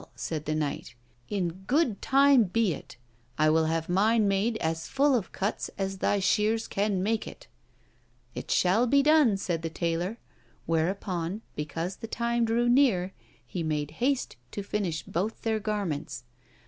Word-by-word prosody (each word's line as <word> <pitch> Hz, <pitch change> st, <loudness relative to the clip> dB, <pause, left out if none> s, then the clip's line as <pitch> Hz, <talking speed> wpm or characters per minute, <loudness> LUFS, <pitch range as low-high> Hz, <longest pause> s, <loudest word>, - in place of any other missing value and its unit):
said 155 Hz, -2 st, -4 dB
the 155 Hz, -, -1 dB
knight, 145 Hz, -5 st, -3 dB, 0.3 s
'in 190 Hz, -4 st, 0 dB, 0.2 s
good 260 Hz, -, +1 dB
time 275 Hz, -3 st, +5 dB
be 200 Hz, 0 st, +1 dB
it! -, -, -10 dB, 0.4 s
I 155 Hz, 0 st, +4 dB
will 160 Hz, 0 st, +3 dB
have 160 Hz, 0 st, -1 dB
mine 210 Hz, +4 st, +3 dB
made 200 Hz, +4 st, +1 dB
as 165 Hz, -4 st, -2 dB
full 280 Hz, +1 st, +2 dB
of 230 Hz, -7 st, 0 dB
cuts 200 Hz, +3 st, -2 dB
as 195 Hz, -1 st, -3 dB
thy 205 Hz, -, +2 dB
shears 215 Hz, +3 st, +1 dB
can 200 Hz, -2 st, 0 dB
make 220 Hz, +2 st, 0 dB
it.' -, -, -11 dB, 0.9 s
'It -, -, -7 dB
shall 205 Hz, +7 st, +3 dB
be 280 Hz, +3 st, +4 dB
done!' 295 Hz, -9 st, +5 dB
said 175 Hz, -4 st, -2 dB
the 165 Hz, -, -3 dB
taylor; 170 Hz, +5 st, -2 dB, 0.5 s
whereupon, 175 Hz, +3 st, -1 dB
because 165 Hz, +5 st, -4 dB
the 225 Hz, -, -7 dB
time 235 Hz, +1 st, 0 dB
drew 235 Hz, +2 st, +1 dB
near, 235 Hz, -8 st, +3 dB, 0.3 s
he 180 Hz, -, -5 dB
made 150 Hz, -2 st, -2 dB
haste 265 Hz, -, 0 dB, 0.2 s
to 205 Hz, -, -4 dB
finish 185 Hz, -7 st, -2 dB
both 195 Hz, +7 st, -3 dB
their 220 Hz, -1 st, 0 dB
garments. 200 Hz, -, -3 dB
195 Hz, 160 wpm, -28 LUFS, 165-230 Hz, 0.9 s, time